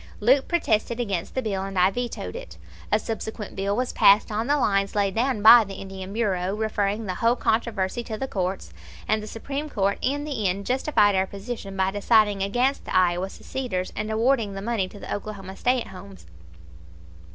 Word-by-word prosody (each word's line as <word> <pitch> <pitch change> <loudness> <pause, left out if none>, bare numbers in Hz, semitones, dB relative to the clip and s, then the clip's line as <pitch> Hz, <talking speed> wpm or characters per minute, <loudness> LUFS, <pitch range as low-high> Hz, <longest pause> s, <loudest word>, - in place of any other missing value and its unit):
Leupp 260 +6 +3
protested 235 -8 0
against 195 -7 -3
the 260 - -1
bill, 195 -3 -2
and 195 0 -5
I 185 +2 +4
vetoed 245 +2 -4
it. - - -9 0.3
A 210 - +5
subsequent 220 -1 -5
bill 200 +1 -1
was 250 +2 -1
passed 200 +2 +5
on 220 +3 -1
the 290 +1 +3
lines 195 -6 +1
laid 200 -2 +1
down 235 -1 0
by 230 +1 +10
the 195 -1 -8
Indian 190 0 -8
Bureau, 195 -3 -1
referring 215 0 -1
the 185 - -2
whole 230 +5 +2
controversy 220 -2 -1
to 220 - -5
the 265 - -3
courts, 190 -4 -3 0.3
and 215 0 +1
the 210 - -8
Supreme 280 +7 -5
Court 200 -5 0
in 285 +2 -1
the 265 -9 -2
end 195 +2 -2
justified 250 -4 +2
our 190 0 +1
position 200 -1 -7
by 190 0 +1
deciding 205 0 +3
against 245 +8 0
the - - -4
Iowa 180 +1 +2
seceders 215 -7 -4
and 215 +1 -3
awarding 225 -1 +1
the 195 - -5
money 220 -4 -1
to 205 - -13
the - - -5
Oklahoma 200 -2 -6
stay 250 +5 +1
at - - -8
homes. 190 +1 -12
210 Hz, 195 wpm, -25 LUFS, 195-240 Hz, 0.3 s, by